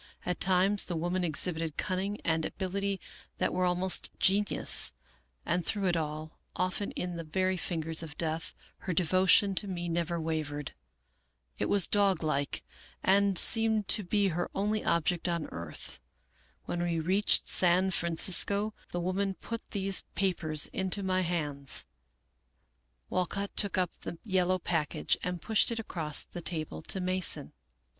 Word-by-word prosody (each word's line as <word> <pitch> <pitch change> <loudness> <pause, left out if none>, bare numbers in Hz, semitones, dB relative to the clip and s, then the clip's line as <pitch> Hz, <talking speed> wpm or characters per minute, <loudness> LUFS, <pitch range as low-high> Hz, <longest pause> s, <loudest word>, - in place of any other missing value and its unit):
At 180 - -2
times 190 +2 +3
the 175 - -4
woman 175 +3 -1
exhibited 160 -1 0
cunning 195 +3 -2
and 160 -1 +1
abil 190 +2 -4
ity 200 -1 -1 0.4
that - - 0
were 185 0 +1
almost 180 +1 +1
genius; 200 +2 +2 0.5
and 180 - 0
through 200 +3 +1
it 175 -2 +2
all, 155 0 -4 0.2
often 185 +3 -1
in 180 -1 -4
the 165 - -5
very 185 +4 0
fingers 165 -3 -3
of 155 -3 -9
death, 160 0 -2 0.2
her 185 - -3
devotion 185 +3 +4
to 200 +2 +2
me 175 -2 -4
never 170 0 -1
wavered. 155 -3 -3 0.9
It - - -1
was 200 -3 +6
doglike, 165 -9 +1 0.4
and 200 0 +3
seemed 220 -1 +4
to 215 - +6
be 200 +2 +1
her 175 +1 -2
only 210 +2 0
object 170 +1 +1
on 170 -2 -1
earth. 85 -2 -7 0.7
When 175 - -3
we 170 -1 0
reached 190 +6 +2
San 185 +1 +3
Francisco, 185 +5 +2 0.2
the 175 - -2
woman 190 +2 -1
put 230 +3 -6
these 195 -2 +2
pa 195 -1 +2
pers 155 -2 +1
into 190 +1 +1
my 185 0 +1
hands." 150 -6 -2 1.3
Walcott 200 +2 -2
took 205 -2 0
up 180 -2 +1
the 170 - -7
yellow 185 -3 +1
package, 165 -4 -1
and 180 -1 -3
pushed 220 -2 +3
it 230 - -3
across 165 -9 -4
the 175 - -9
table 155 - -4
to 190 - +2
Mason. 185 0 +2
180 Hz, 150 wpm, -30 LUFS, 165-195 Hz, 1.3 s, was